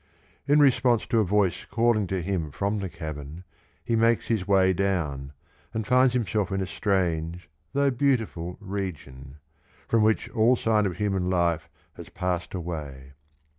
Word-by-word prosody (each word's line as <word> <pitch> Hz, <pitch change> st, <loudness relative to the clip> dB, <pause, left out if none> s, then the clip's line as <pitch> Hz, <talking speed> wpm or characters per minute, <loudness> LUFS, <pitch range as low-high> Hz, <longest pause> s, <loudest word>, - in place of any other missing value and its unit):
In 145 Hz, +1 st, +5 dB
response 125 Hz, -4 st, +3 dB
to 115 Hz, -, +1 dB
a -, -, +4 dB
voice 95 Hz, -2 st, +1 dB
calling 115 Hz, -3 st, +1 dB
to 95 Hz, -1 st, -2 dB
him 90 Hz, -4 st, -2 dB
from 100 Hz, +7 st, -2 dB
the 95 Hz, -2 st, -4 dB
cavern 80 Hz, 0 st, -7 dB, 0.4 s
he 115 Hz, -, +1 dB
makes 115 Hz, +1 st, +2 dB
his 110 Hz, -5 st, 0 dB
way 95 Hz, -2 st, +4 dB
down, 80 Hz, -8 st, -1 dB, 0.4 s
and 110 Hz, -1 st, -2 dB
finds 125 Hz, +2 st, +4 dB
himself 105 Hz, -5 st, 0 dB
in 95 Hz, -, -1 dB
a 95 Hz, -, -1 dB
strange, 90 Hz, -5 st, -1 dB, 0.3 s
though 140 Hz, 0 st, +2 dB
beauti 125 Hz, -3 st, +2 dB
ful 85 Hz, +1 st, -7 dB
region, 80 Hz, -10 st, -6 dB, 0.5 s
from 115 Hz, -, +2 dB
which 110 Hz, 0 st, +2 dB
all 115 Hz, +3 st, +4 dB
sign 110 Hz, -3 st, +2 dB
of 90 Hz, -, -5 dB
human 95 Hz, -3 st, 0 dB
life 85 Hz, -3 st, 0 dB, 0.3 s
has -, -, -10 dB
passed 90 Hz, 0 st, -3 dB
away. 75 Hz, -6 st, -6 dB
95 Hz, 160 wpm, -26 LUFS, 85-110 Hz, 0.5 s, In